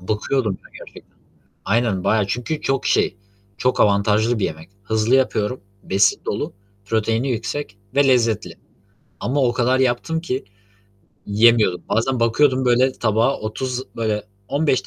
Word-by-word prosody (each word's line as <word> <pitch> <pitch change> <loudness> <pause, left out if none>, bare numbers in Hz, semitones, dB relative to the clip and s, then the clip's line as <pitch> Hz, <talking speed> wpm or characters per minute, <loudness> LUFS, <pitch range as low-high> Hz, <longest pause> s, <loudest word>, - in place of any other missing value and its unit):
Bakıyordum 105 +2 -1 0.2
gerçekten. - - -15 0.5
Aynen 110 -4 0
bayağı, 110 -2 +2
çünkü 125 +9 -3
çok 135 -1 -1
şey, - - +1 0.4
çok 125 +2 +1
avantajlı 105 +3 +3
bir 100 - 0
yemek. 80 +3 -5
Hızlı 110 +3 +1
yapıyorum, 125 -2 +1 0.2
besin 95 +1 +2
dolu, - - -3 0.3
proteini 115 +4 0
yüksek 115 -1 -4 0.2
ve 140 0 +4
lezzetli 115 -4 +1 0.7
ama 140 +3 0
o 120 -1 +2
kadar 125 +1 +1
yaptım 130 +6 0
ki 135 -5 -3 0.8
yiyemiyordum. 105 -3 +3
Bazen 115 +4 0
bakıyordum 130 +3 +3
böyle 125 +2 +3
tabağı 115 +2 +1
30, 125 +4 -4
böyle 110 -2 -1 0.3
15 140 -7 +1
115 Hz, 130 wpm, -21 LUFS, 105-130 Hz, 0.8 s, ve